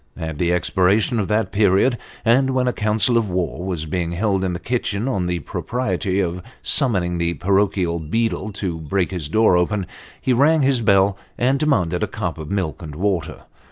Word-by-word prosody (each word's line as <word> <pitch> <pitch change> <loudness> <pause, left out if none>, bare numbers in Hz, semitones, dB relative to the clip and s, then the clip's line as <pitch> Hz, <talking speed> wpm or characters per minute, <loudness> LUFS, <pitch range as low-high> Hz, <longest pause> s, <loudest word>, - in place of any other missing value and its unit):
At 80 -2 -5
the 85 0 +1
expiration 95 +6 +2
of 100 - -1
that 105 -2 0
period, 100 +4 +3 0.3
and 130 +3 +3
when 125 -1 +1
a 125 - +1
council 110 +3 +2
of 110 -3 -2
war 90 -1 -2
was 90 -4 -3
being 85 +1 -2
held 95 +1 0
in 90 -2 -1
the 85 - -4
kitchen 115 -2 -2
on 95 -9 -1
the 90 0 -1
propriety 95 - -2
of 90 -1 -1 0.2
summoning 95 - +1
the 85 0 0
parochial 95 -3 +1
beadle 110 +5 -1
to 90 -5 -4
break 90 +5 -1
his 85 -6 -3
door 110 +1 +4
open, 95 +2 0 0.3
he 130 - +1
rang 145 +4 +4
his 130 -2 +2
bell, 100 -2 +3 0.2
and 130 +3 +2
demanded 90 - +1
a - - 0
cup - - -4
of 75 -1 -7
milk 95 -6 -2
and 75 -3 -8
water. 95 0 -2
95 Hz, 190 wpm, -21 LUFS, 90-115 Hz, 0.3 s, door